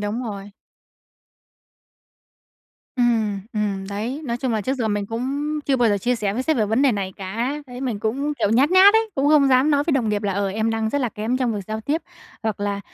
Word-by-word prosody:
Đúng 210 +4 -2
rồi. 205 -3 -6 2.5
Ừm, 225 -5 +1
ừm, 200 -3 -2
đấy, 225 +8 -4
nói 235 -2 -2
chung 255 -1 -2
là 220 - 0
trước 260 +6 -1
giờ 230 -4 -1
mình 205 -1 -1
cũng 280 +7 -2
chưa 275 - +2
bao 240 -2 +3
giờ 205 -1 +2
chia 245 +5 0
sẻ 205 -2 -1
với 255 - -1
sếp 315 +1 +1
về 215 -2 +1
vấn 225 +6 +1
đề 270 -4 +4
này 195 -2 -3
cả. 230 +9 -3
Đấy 250 0 -9
mình 245 -6 -2
cũng, 270 +7 -1
kiểu, 205 - +1
nhát 265 +8 +3
nhát 385 +3 +7
ấy, 445 -1 +2
cũng 275 +1 +1
không 295 -2 +5
dám 260 +4 +4
nói 285 0 +2
với 320 - 0
đồng 245 -5 +1
nghiệp 210 -1 -1
là 200 -1 0
"Ờ, 200 0 -1
em 220 +3 -1
đang 225 -1 -1
rất 285 - 0
là 250 - 0
kém 220 +4 -2
trong 245 -4 0
việc 205 - -3
giao 220 0 -4
tiếp." 305 +8 -1 0.4
Hoặc 220 -2 -2
là 200 0 -2
230 Hz, 235 wpm, -22 LUFS, 205-270 Hz, 2.5 s, nhát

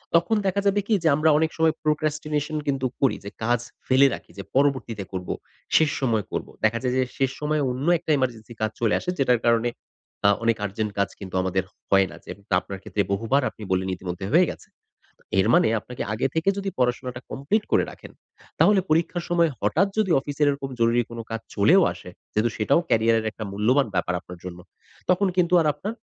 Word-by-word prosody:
তখন 170 +7 +3
দেখা 195 +1 +1
যাবে 200 0 +3
কি? 225 - +2
যে, - - +3
আমরা 155 +2 +3
অনেক 160 0 +1
সময় 160 -1 +3
প্রোকাস্টিনেশন 150 0 -1
কিন্তু 135 -2 0 0.2
করি 135 - +3
যে, - - -4
কাজ 120 +2 +2 0.3
ফেলে 135 +2 +6
রাখি - - -9
যে 100 - -5
পরবর্তীতে 130 -7 +1
করব, 90 -1 -5 0.5
শেষ 160 -1 +5
সময় 115 -5 +1
করবো। - - -4
দেখা 110 +1 +3
যায় 125 -1 0
যে, - - +3 0.2
শেষ 135 -1 +2
সময় 150 0 0
অন্য 130 +6 -3
একটা 160 - -3
এমার্জেন্সি 120 -3 -3
কাজ 110 -1 0
চলে 115 -3 +2
আসে। - - -5
যেটার 125 -3 +3
কারণে 115 0 +3 0.6
আ - - +7
অনেক 115 -1 +2
আর্জেন্ট 105 +2 -3
কাজ 100 - +2
কিন্তু 95 -2 -8
আমাদের 95 0 0 0.3
হয় 95 -1 +4
না। - - -10
যে - - -8 0.2
তা - - -1
আপনার 95 -1 -8
ক্ষেত্রে 105 - -1
বহুবার 115 +8 +1
আপনি 110 - -12
বললেন, 95 0 +1
ইতিমধ্যে 90 0 -6
হয়ে 175 +1 +5
গেছে। - - -9 0.5
তো - - -27 0.2
এর 95 - +4
মানে - - +5
আপনাকে 125 +3 -7
আগে 110 - 0
থেকে 160 +3 0
যদি 195 0 -2
পড়াশোনাটা 125 0 -1
কমপ্লিট 180 +11 0
করে - - +4
রাখেন, - - -13 0.5
তাহলে 205 -1 +5
পরীক্ষার 170 +2 +1
সময় 170 -2 +3
হঠাৎ 155 - +2
যদি 210 -4 +2
অফিসের 145 +1 -1
এরকম 140 -1 -4
জরুরী 115 +1 +3
কোন 115 - -8
কাজ 115 0 -3 0.2
চলেও 160 - +5
আসে, 90 - -11 0.2
যেহেতু 110 +2 +1
সেটাও 135 +9 +3
ক্যারিয়ারের 115 0 +2
একটা 110 - -7
মূল্যবান 120 +8 +2
ব্যাপার 90 - 0
আপনার 90 0 -11
জন্য। 90 -1 -7 0.5
তখন 185 +2 +3
কিন্তু 180 -1 +2
আর 160 - +1
আপনার 210 +3 -5
130 Hz, 200 wpm, -24 LUFS, 110-155 Hz, 0.6 s, আ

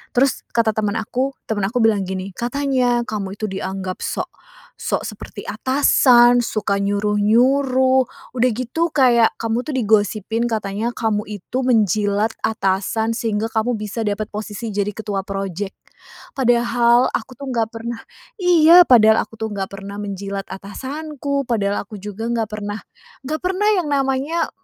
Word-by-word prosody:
Terus 265 +2 +2
kata 230 -2 +2
teman 210 0 -1
aku, 260 +5 -2
temen 205 -3 0
aku 245 +3 -1
bilang 205 -4 +2
gini, 190 +1 -4
"Katanya 245 -1 0
kamu 200 -2 -4
itu 215 - -1
dianggap 190 -1 -4
sok - - -3 0.5
sok - - -2
seperti - - -9
atasan, 245 -2 +4
suka 205 -4 -1
nyuruh-nyuruh, 250 +6 +3 0.3
udah 250 +1 +3
gitu 255 +8 -1
kayak 245 -5 +4
kamu 230 +1 -1
tuh 305 - -4
digosipin 220 0 +1
katanya 215 0 -2
kamu 210 -2 0
itu 210 +5 -4
menjilat 210 -1 +2
atasan 220 +2 0
sehingga 220 -1 -1
kamu 225 +2 0
bisa 215 +2 -4
dapat 205 0 -2
posisi 215 +1 -5
jadi 205 0 0
ketua 205 -3 -3
project." 195 0 -4 0.6
Padahal 240 -1 +3
aku - - -4
tuh 280 - -7
nggak 225 -2 0
pernah 230 +1 -6 0.4
iya, 350 0 +7
padahal 220 -7 +5
aku 225 - -16
tuh 220 - -2
nggak 195 -1 -4
pernah 200 0 -8
menjilat 200 0 -4
atasanku, 280 +7 -4
padahal 205 -4 0
aku 215 - -9
juga 210 +2 -5
nggak 230 -2 -1
pernah 205 0 -5 0.5
nggak 310 +2 -2
pernah 380 +3 +1
yang 345 -5 -1
namanya, 275 +4 0
225 Hz, 145 wpm, -20 LUFS, 205-255 Hz, 0.6 s, iya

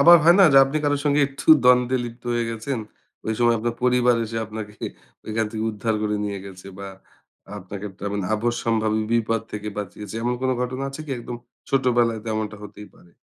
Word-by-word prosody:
আবার 170 +4 +9
হয় 170 +1 +8
না - - +9
যে - - +5
আপনি 135 +3 -3
কারো 145 0 +2
সাথে 145 0 +2
একটু 135 - -10 0.2
দ্বন্দ্বে 125 0 +5
লিপ্ত 120 0 -9
হয়ে 120 0 0
গেছেন। 115 +3 -3 0.5
ওই 110 - 0
সময় 120 -1 +4
আপনার 115 +1 -2
পরিবার 125 -1 +4
এসে 115 +1 -6
আপনাকে 105 -1 -7 0.5
ওইখান 110 +1 0
থেকে 110 0 -4
উদ্ধার 110 +1 -2
করে 105 0 0
নিয়ে 100 -1 -3
গেছে 95 -1 -11
বা 100 - -6 0.7
আপনাকে 100 +1 -8
একটা 95 +1 -11
মানে 100 -2 -2
আপদসম্ভাবী 110 -1 0
বিপদ 115 -1 +1
থেকে 105 0 -4
বাঁচিয়েছে। 105 +1 -7
এমন 120 +1 0
কোন 130 0 +1
ঘটনা 130 +2 -2
আছে 135 - -8
কি? - - -8
একদম 120 0 -6 0.3
ছোট 135 -1 +2
বেলায় 115 -2 +2
তো - - -14
এমনটা 110 -1 -3
হতেই 105 0 -10
পারে। 85 - -21
115 Hz, 200 wpm, -23 LUFS, 105-125 Hz, 0.7 s, আবার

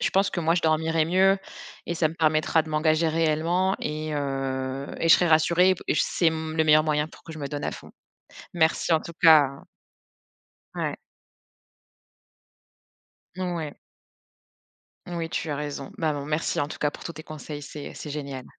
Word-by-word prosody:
Je - - +1
pense 195 +1 +2
que 175 - -2
moi 165 0 +2
je 175 - 0
dormirai 160 0 +2
mieux 190 +4 +3 0.5
et 170 - -2
ça 160 -2 +2
me 160 - -9
permettra 155 0 +2
de 160 - -11
m'engager 155 +1 +2
réellement 165 +4 +1
et 155 0 -3
heu, 135 -1 -3
et 165 - +1
je 165 - +10
serai 180 - +3
rassurée 170 +3 +4
et 185 - +3
p - - -12
c'est 170 -2 +2
mmh, 160 0 -4
le 160 - +3
meilleur 155 0 +5
moyen 150 0 0
pour - - -17
que 165 - -10
je 155 - -9
me 140 - -4
donne 145 -1 -4
à - - -2
fond. - - -11 0.6
Merci 165 0 +2
en 160 - +4
tout 170 - -9
cas 160 -2 +9
hein 140 0 -5 1.1
Ouais. - - -2 2.4
Ouais. 170 -5 -3 1.3
Oui, 170 -2 -4
tu 160 - -3
as 145 - -1
raison. 145 -2 -5
Bah, 155 -2 0
bon 140 -1 -5
merci 150 +2 -1
en 145 - -1
tout - - -7
cas 150 - +1
pour - - -11
tous 170 - -5
tes 155 - -10
conseils, 150 -1 -8
c'est 145 +1 -8
c'est 150 - -8
génial. 140 -3 -6
155 Hz, 185 wpm, -25 LUFS, 150-165 Hz, 2.4 s, je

